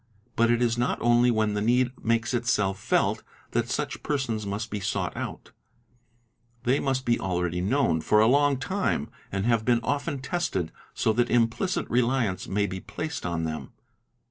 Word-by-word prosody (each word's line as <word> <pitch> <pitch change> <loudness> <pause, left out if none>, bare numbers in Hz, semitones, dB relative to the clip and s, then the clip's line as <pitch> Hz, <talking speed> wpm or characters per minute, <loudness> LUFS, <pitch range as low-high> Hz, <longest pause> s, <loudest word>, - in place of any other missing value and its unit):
But 115 0 +3
jt 120 0 +2
is 120 0 +1
not 120 - +1
only 120 +1 +4
when 110 -2 +1
the 105 - -1
need 125 +3 +3
makes 115 +2 +1
itself 105 -5 +1
felt - - +1 0.3
that - - 0
such - - -2
persons 115 -8 -2
must 105 +3 -4
be 105 - -2
sought 100 - -2
out; - - -6 1.1
they 130 +3 +2
must 135 -1 -1
be 120 0 +2
already 90 -1 -1
known 100 - +1
for 105 +6 +3
a 110 - +6
long 140 +3 +4
time 185 - -1 0.2
and 95 +1 -1
have 115 -2 +2
been 120 0 +3
~ - - -15
often 145 +3 -1
tested, 130 - -2 0.2
so 110 - +2
that 120 +2 +1
implicit 120 - +1
reliance 120 -6 +1
may 100 +1 +1
be 95 -1 -4
placed 155 - -5
on 85 -1 -2
them. 80 -1 -5
115 Hz, 175 wpm, -26 LUFS, 100-130 Hz, 1.1 s, a